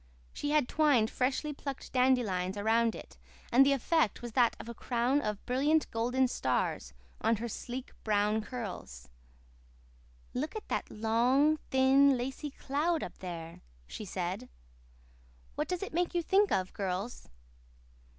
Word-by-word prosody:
She 290 - -3
had 295 -4 +3
twined 285 -8 +3
freshly 275 +4 -1
plucked 275 -1 -7
dandelions 220 -8 +2
around 225 +2 +2
it - - -11 0.3
and 260 +3 +7
the 280 - +4
effect 275 - +1
was 240 - -5
that 240 0 +3
of - - -8
a 235 - -5
crown 245 +4 0
of 210 -5 -4
brilliant 290 +5 +2
golden 245 +3 +1
stars 130 - -1 0.3
on 230 - +3
her 230 +3 -4
sleek, 250 +3 -6
brown 210 0 +2
curls. 205 - -7 1.2
"Look 300 - -3
at 435 - -6
that - - -2
long, 245 +8 +2
thin, 265 +1 +5
lacy 265 +4 -4
cloud 300 +5 -1
up - - -8
there," 170 -3 -7 0.2
she 215 - -7
said. 190 +5 -4 1.0
"What - - -2
does 360 +1 -2
it 390 - -6
make 350 +1 0
you 345 - +1
think 395 +3 +3
of, 185 -1 0
girls?" 195 - -4
245 Hz, 145 wpm, -31 LUFS, 215-280 Hz, 1.2 s, and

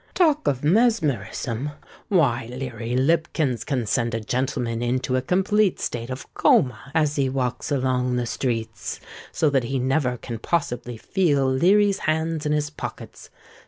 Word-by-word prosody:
Talk 310 -4 +3
of 135 -1 0
mesmerism! 150 - +1 0.3
why—Leary 125 - 0
Lipkins 145 -3 +1
can 125 -1 -1
send 115 +1 0
a - - -1
gentleman 120 0 -2
into 125 +1 0
a 130 - +1
complete 195 +6 +2
state 120 0 -3
of 130 +1 -5
coma 125 +1 +2
as 150 -2 +2
he 135 -2 +2
walks 130 -2 -2
along 125 -2 +1
the 125 -1 0
streets, 115 -5 -3 0.3
so 155 - +1
that 135 -3 +2
he 135 +3 -1
never 130 0 +1
can 115 -1 -6
possibly 120 -5 -2
feel 145 - +1
Leary's 195 +9 +3
hands 160 0 -1
in - - 0
his 150 0 0
pockets. - - -8
130 Hz, 145 wpm, -24 LUFS, 120-155 Hz, 0.3 s, Talk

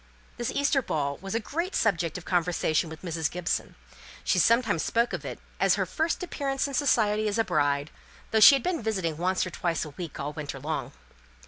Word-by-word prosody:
This 240 - -2
Easter 280 -1 +2
ball 140 - -2
was 195 +2 -5
a - - +2
great 335 - -3
subject 175 -7 +1
of 175 - -10
conversation 170 -2 +1
with 160 +2 -10
Mrs. 165 -3 -1
Gibson. 180 0 -2 0.5
She - - +2
sometimes 230 -7 +3
spoke 235 +1 +1
of - - -4
it - - -5 0.2
as - - +4
her - - 0
first 330 +3 -1
appearance 275 -5 -2
in 280 - -7
society 215 -6 +2
as 205 - -1
a 225 - +3
bride, 145 -4 0 0.4
though 220 - +3
she 215 +6 +10
had 270 - -2
been 360 -5 -1
visiting 190 -8 -1
once 185 +3 +1
or 185 - -6
twice 170 -2 -1
a 150 - -9
week 165 +1 -7
all 145 +2 -3
winter 145 -3 -6
long. 155 +4 -3
185 Hz, 205 wpm, -27 LUFS, 160-235 Hz, 0.5 s, she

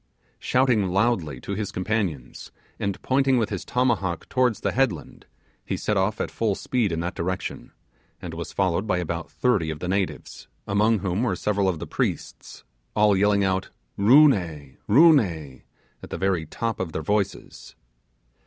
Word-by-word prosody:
Shouting 125 -6 +2
loudly 90 - 0
to - - -7
his 100 0 -3
companions, 95 - -3 0.3
and 100 -2 -2
pointing 135 0 +2
with 110 -3 0
his 100 - -3
tomahawk 100 -9 -1
towards 125 -4 +1
the - - 0
headland, 120 - -2 0.4
he - - -3
set 105 - -1
off 100 +2 0
at - - -2
full 110 -3 0
speed 115 -4 -1
in 80 0 -2
that 90 +2 -3
direction, 90 +2 -4 0.5
and 85 -2 -7
was 80 0 -6
followed 95 +1 0
by 100 - +1
about 85 -1 -4
thirty 105 -11 +1
of 80 - -4
the 90 - -5
natives, 95 0 -3 0.2
among 105 +1 +2
whom 95 +3 0
were 120 -7 0
several 100 +1 0
of 90 - -2
the - - -6
priests, - - -4 0.3
all 105 -1 +4
yelling 100 +1 +3
out 95 -1 0 0.3
'Roo 130 +10 +7
ne! 80 - -2
Roo 155 +9 +7
ne!' 80 - -2 0.4
at - - -10
the - - -4
very 90 -3 0
top 115 +6 -3
of 85 -4 -4
their 80 - -3
voices. 100 +3 -3
100 Hz, 170 wpm, -24 LUFS, 85-110 Hz, 0.5 s, Roo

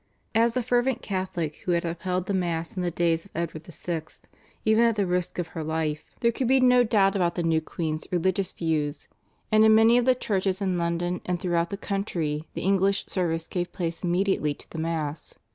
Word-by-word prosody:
As 230 +2 +3
a 250 - +1
fervent 245 +1 +1
Catholic, 185 -6 -3
who 180 - -1
had 170 0 0
upheld 180 +2 -2
the 200 - -2
Mass 170 -3 -2
in 185 - -2
the 175 - 0
days 165 0 0
of 200 - -18
Edward 160 -1 -4
VI. 170 -1 -4 0.6
even 220 +1 +4
at 230 -2 +3
the 205 -2 +1
risk 180 -1 -1
of 175 -2 -3
her 160 -1 -5
life, 155 -1 -2 0.2
there 235 - +4
could 245 +1 -2
be 265 +1 +5
no 250 -1 +5
doubt 205 -3 +3
about 175 -3 +1
the 175 - -1
new 165 -1 +2
queen's 155 -1 -4
religious 185 +2 +1
views, 150 -3 -2 0.4
and 215 0 +6
in 220 0 +7
many 225 +2 +6
of 240 - 0
the 255 -1 +5
churches 190 -5 -1
in 190 -3 0
London 170 +1 -1
and 180 -1 0
throughout 170 -1 0
the 200 - -4
country 170 -7 -2
the - - -3
English 195 +1 +2
service 165 -3 -1
gave 175 -1 -3
place 165 -2 -3
immediately 175 -4 +1
to - - -15
the 160 - -5
Mass. 160 -2 -3
180 Hz, 210 wpm, -26 LUFS, 165-200 Hz, 0.6 s, in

